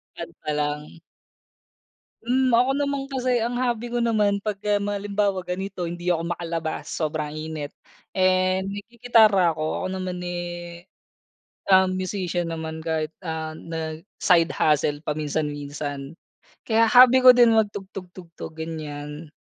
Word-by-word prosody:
Kanta 120 - -6
lang. 150 +2 -3 1.3
Hmm, 255 +2 +2
ako 250 +2 +4
naman 280 -1 -1
kasi 255 -1 +1
ang 235 +1 -1
hobby 240 -1 -1
ko 240 - +1
naman 210 -3 +2
pagka 205 0 -1
ma 205 0 -1
halimbawa 200 -2 -1
ganito 180 0 -4
hindi 175 +1 -4
ako 170 0 0
makalabas 165 -3 -4
sobrang 155 -1 -3
init, 155 -2 -5 0.5
eh, 185 0 +3
naggigitara 210 -3 +3
ako. 155 +3 -3
Ako - - 0
naman, 185 -1 -4
eh, 175 0 -6 0.8
um, 190 0 +7
musician 180 -2 -2
naman 160 -1 -5
kahit, 160 -1 -2
ah, 160 -2 -4
nag 160 -1 -6 0.2
side 170 -2 +4
hustle 150 -1 +1
paminsan-minsan. 145 0 -3 0.4
Kaya 225 0 +3
hobby 250 +2 +8
ko 255 -1 +9
din 235 -2 +6
magtugtog-tugtog 190 -5 -5
ganyan. 150 -1 -7
175 Hz, 125 wpm, -24 LUFS, 160-210 Hz, 1.3 s, ko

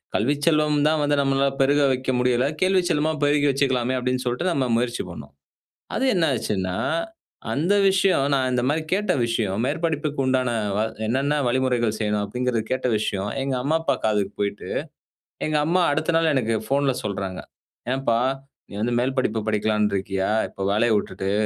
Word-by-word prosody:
"கல்விச் 145 +6 0
செல்வம் 150 -2 +3
தான் 155 0 +2
வந்து 145 0 +2
நம்மளால 135 0 +2
பெருக 145 +2 +3
வைக்க 130 0 -1
முடியல. 125 +1 +2 0.2
கேள்விச் 185 -1 +2
செல்வமா 155 +1 +1
பெருகி 145 0 +3
வச்சுக்கலாமே" 130 -2 +1
அப்படீன்னு 125 0 -1
சொல்லிட்டு 125 +9 -1
நம்ம 135 -5 0
முயற்சி 120 0 -1
பண்ணோம். - - -10 0.7
அது 265 - 0
என்ன 175 -3 +2
ஆச்சுன்னா, 95 -4 -2 0.8
அந்த 165 - +1
விஷயம், 190 -7 +3
நான் 130 -1 +1
இந்த 125 -1 +1
மாதிரி 155 +2 0
கேட்ட 210 +2 +1
விஷயம், 110 -4 -1
மேற்படிப்புக்கு 150 -2 -1
உண்டான 130 -1 +1 0.3
வ - - +2 0.3
என்னான்ன 140 +5 +1
வழிமுறைகள் 120 -3 +1
செய்யணும்? 105 -1 0
அப்படீங்கிறது 125 +1 -1
கேட்ட 130 0 -1
விஷயம், 100 -1 -2
எங்க 135 -1 -1
அம்மா, 155 +4 +1
அப்பா 140 -5 +1
காதுக்கு 105 -2 0
போயிட்டு, 100 0 -3 0.8
எங்க 155 -1 +1
அம்மா 180 +2 +2
அடுத்த 155 +3 0
நாள், 165 -1 +2
எனக்கு 115 -3 +1
ஃபோன்ல 140 -1 +1
சொல்றாங்க. 95 -3 -4 0.5
"ஏன்பா, 120 -4 +1 0.5
நீ - - -13
வந்து 120 +2 0
மேல் 130 +2 -2
படிப்பு 110 -3 0
படிக்கலாம்னு 105 -1 +1
இருக்கியா? 95 +1 -2 0.2
இப்ப 100 - -11
வேலைய 115 +2 +2
விட்டுட்டு? 95 -1 -3
130 Hz, 160 wpm, -23 LUFS, 110-145 Hz, 0.8 s, செல்வம்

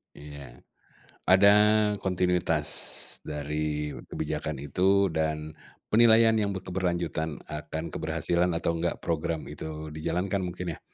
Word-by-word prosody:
Iya. 70 -4 -11 0.6
Ada 95 +2 +6 0.6
kontinuitas 90 -4 +1 0.6
dari 75 0 -3 0.2
kebijakan 75 -1 -3
itu 95 +7 +2
dan 80 -1 -2 0.3
penilaian 115 0 +6
yang 100 -2 0
be 95 - -4
keberlanjutan 85 -4 -2
akan 75 +1 -5
keberhasilan 85 +3 0
atau 85 0 -1
enggak 85 +1 -2
program 85 -1 -2
itu 75 +1 -7
dijalankan 90 +5 -2
mungkin, 90 -2 -4
ya? - - -18
80 Hz, 110 wpm, -27 LUFS, 75-90 Hz, 0.6 s, Ada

